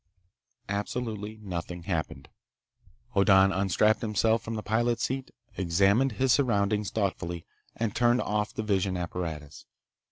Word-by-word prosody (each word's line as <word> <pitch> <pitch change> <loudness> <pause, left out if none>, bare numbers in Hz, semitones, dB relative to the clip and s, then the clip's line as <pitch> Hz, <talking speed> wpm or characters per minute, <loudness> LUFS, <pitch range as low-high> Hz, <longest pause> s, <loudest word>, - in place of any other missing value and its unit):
Absolutely 105 +1 -3
nothing 90 -2 -5
happened. 80 -6 -3 0.9
Hoddan 95 -1 +5
unstrapped 100 +3 +2
himself 110 +1 +1
from 115 - -5
the 110 - -4
pilot's 120 +2 +1
seat, 135 0 -2 0.3
examined 100 +8 +3
his 130 +2 +2
surroundings 105 -5 +1
thoughtfully, 90 -5 -2 0.3
and 110 -3 -2
turned 120 +1 +3
off 105 0 -1
the 110 - -4
vision 95 -3 0
apparatus. 80 -6 -5
100 Hz, 120 wpm, -28 LUFS, 90-110 Hz, 0.9 s, Hoddan